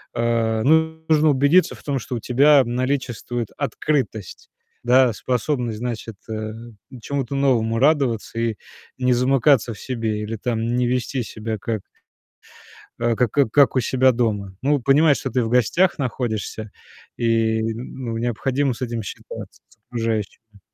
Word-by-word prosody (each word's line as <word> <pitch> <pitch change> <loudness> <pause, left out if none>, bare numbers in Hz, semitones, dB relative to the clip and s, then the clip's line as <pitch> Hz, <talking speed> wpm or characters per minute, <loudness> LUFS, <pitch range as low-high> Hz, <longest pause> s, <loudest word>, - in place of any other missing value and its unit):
э, 115 -1 +1
ну, 160 +2 +2
нужно 155 0 +4
убедиться 145 +6 +3
в - - -17
том, 140 -2 -1
что 125 - -5
у - - -3
тебя 140 +4 +5
наличествует 120 -2 -2
открытость, 135 - -2 0.3
да, 125 -1 +4
способность, 125 -1 -2
значит, 115 -3 -5
э, 110 0 -4 0.5
чему-то 140 0 -3
новому 115 -5 +2
радоваться 130 -6 +1
и 115 -1 0 0.4
не 125 -1 +2
замыкаться 125 -1 +3
в - - -14
себе 115 -4 -3
или 110 +2 -4
там 115 +1 -2
не 125 -1 +1
вести 125 +1 -1
себя 110 0 -5
как 110 -2 -3 1.2
э, 115 -1 +1
как 120 -3 +1 0.2
как 140 -2 +4
у - - +4
себя 130 +2 +3
дома. 105 -5 -2
Ну, 145 +1 +2
понимать, 140 +3 +4
что 130 - -4
ты 125 0 0
в 110 - -2
гостях 125 - +2
находишься, 110 -4 -3 0.5
и 115 -1 +1
ну, 115 +1 -4
необходимо 125 +3 0
с 125 - -13
этим 115 -3 -3
считаться, - - -9
с - - -25
окружающими. 110 -2 -4
120 Hz, 145 wpm, -22 LUFS, 115-135 Hz, 1.2 s, тебя